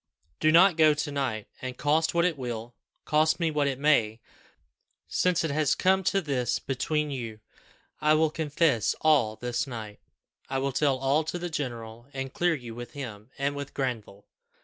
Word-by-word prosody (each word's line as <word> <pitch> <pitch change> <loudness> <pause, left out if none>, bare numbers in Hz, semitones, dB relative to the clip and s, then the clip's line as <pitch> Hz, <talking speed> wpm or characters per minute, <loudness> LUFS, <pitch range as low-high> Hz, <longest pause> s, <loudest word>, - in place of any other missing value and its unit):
Do 155 - +4
not 175 +1 +6
go 155 -2 +6
to 150 0 -3
night, 130 -7 -2
and, 130 -1 -5
cost 160 +3 +1
what 170 0 +3
it 180 -3 +1
will 120 -3 -5 0.3
cost 155 +2 +2
me 165 -2 +1
what 150 -2 +1
it 135 -2 -1
may, 120 -7 +2 0.9
since 180 -2 +1
it 160 - -1
has 150 0 +2
come 190 +1 +2
to 195 +2 +2
this 125 -6 -1
between 150 +3 -2
you, 115 -5 -5 0.6
I 150 0 +4
will 155 0 +2
confess 150 - +1
all 140 -9 +3
this 120 +3 -2
night 110 -5 -7 0.5
I 135 - -1
will 135 +1 0
tell 140 0 +2
all 135 +4 +2
to 170 - -3
the 175 0 -5
general, 120 -5 -5
and 135 0 -4
clear 175 -1 +2
you 120 -5 -8
with 120 +3 -8
him 115 -6 -8
and 140 +1 -1
with 140 -1 -7
Granville. 115 -7 -4
140 Hz, 180 wpm, -27 LUFS, 120-155 Hz, 0.9 s, not